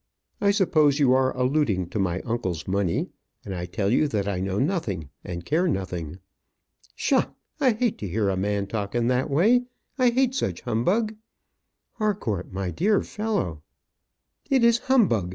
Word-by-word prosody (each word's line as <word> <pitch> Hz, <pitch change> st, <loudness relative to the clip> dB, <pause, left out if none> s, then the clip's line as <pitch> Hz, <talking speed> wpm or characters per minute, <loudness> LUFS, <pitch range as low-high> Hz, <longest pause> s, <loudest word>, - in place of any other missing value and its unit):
I 200 Hz, -, +5 dB
suppose 155 Hz, -8 st, +3 dB
you 135 Hz, -4 st, +4 dB
are 130 Hz, 0 st, +3 dB
alluding 125 Hz, -, +1 dB
to 105 Hz, -, -3 dB
my 90 Hz, -1 st, 0 dB
uncle's 110 Hz, -9 st, -3 dB
money; 95 Hz, -2 st, 0 dB, 0.4 s
and 100 Hz, -, -5 dB
I 90 Hz, -1 st, -4 dB
tell 100 Hz, +3 st, -1 dB
you 150 Hz, +5 st, +3 dB
that 105 Hz, -7 st, -2 dB
I 100 Hz, -3 st, -1 dB
know 95 Hz, +1 st, -2 dB
nothing 115 Hz, -, -1 dB
and 85 Hz, -1 st, -6 dB
care 170 Hz, +5 st, +1 dB
nothing." 90 Hz, -, -3 dB, 0.8 s
"Psha! -, -, +1 dB, 0.3 s
I 260 Hz, -5 st, +4 dB
hate 225 Hz, 0 st, -1 dB
to 105 Hz, -, -4 dB
hear 100 Hz, +3 st, 0 dB
a 95 Hz, -, 0 dB
man 100 Hz, +1 st, -1 dB
talk 100 Hz, +1 st, -4 dB
in 120 Hz, 0 st, +2 dB
that 130 Hz, +3 st, +1 dB
way. 220 Hz, -, +3 dB, 0.3 s
I 250 Hz, -1 st, +5 dB
hate 255 Hz, +1 st, +2 dB
such 95 Hz, -, -2 dB
humbug." 205 Hz, -, 0 dB, 0.8 s
"Harcourt, 195 Hz, -, -2 dB
my 95 Hz, -1 st, -3 dB
dear 200 Hz, -, +2 dB
fellow 205 Hz, -, -2 dB, 0.4 s
" -, -, -42 dB
"It 265 Hz, -3 st, +3 dB
is 235 Hz, 0 st, +5 dB
humbug. 190 Hz, -, +2 dB
120 Hz, 170 wpm, -25 LUFS, -, 0.8 s, I